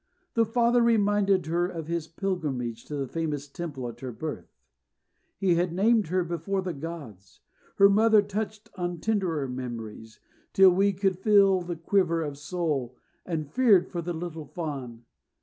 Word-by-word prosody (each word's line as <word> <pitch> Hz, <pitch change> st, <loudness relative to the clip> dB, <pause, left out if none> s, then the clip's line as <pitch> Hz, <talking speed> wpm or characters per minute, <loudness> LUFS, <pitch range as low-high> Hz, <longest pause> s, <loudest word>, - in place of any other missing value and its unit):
The 230 Hz, -1 st, +3 dB
father 240 Hz, +1 st, +3 dB
reminded 205 Hz, -5 st, +3 dB
her 170 Hz, +2 st, 0 dB
of 165 Hz, -4 st, -6 dB
his 165 Hz, -1 st, -3 dB
pilgrimage 150 Hz, -, -3 dB
to 150 Hz, -, -5 dB
a 135 Hz, -, -3 dB
famous 150 Hz, -2 st, -3 dB
Temple 140 Hz, -4 st, -6 dB
at 120 Hz, -, -9 dB
her 130 Hz, -2 st, -5 dB
birth: 155 Hz, +5 st, -6 dB, 0.9 s
"He 185 Hz, -2 st, +2 dB
had 175 Hz, +1 st, +1 dB
named 215 Hz, +3 st, +3 dB
her 180 Hz, +2 st, +1 dB
before 175 Hz, +3 st, -2 dB
the 180 Hz, -2 st, -3 dB
gods." 140 Hz, -, -9 dB, 0.3 s
Her 200 Hz, -, +7 dB
mother 215 Hz, +1 st, +5 dB
touched 215 Hz, +1 st, -5 dB
on 175 Hz, -2 st, -3 dB
tenderer 180 Hz, -9 st, -1 dB
memories, 115 Hz, -3 st, -7 dB, 0.3 s
till 190 Hz, -1 st, +7 dB
we 195 Hz, +3 st, +3 dB
could 190 Hz, -1 st, 0 dB
feel 195 Hz, -2 st, +5 dB
the 175 Hz, 0 st, -4 dB
quiver 170 Hz, -1 st, +1 dB
of 145 Hz, -2 st, -6 dB
soul, 145 Hz, -6 st, -2 dB, 0.3 s
and 160 Hz, -4 st, -2 dB
feared 220 Hz, -7 st, +4 dB
for 175 Hz, -, -3 dB
the 175 Hz, +1 st, -4 dB
little 160 Hz, -2 st, -6 dB
Fawn. 135 Hz, -9 st, -6 dB
175 Hz, 160 wpm, -27 LUFS, 150-195 Hz, 0.9 s, Her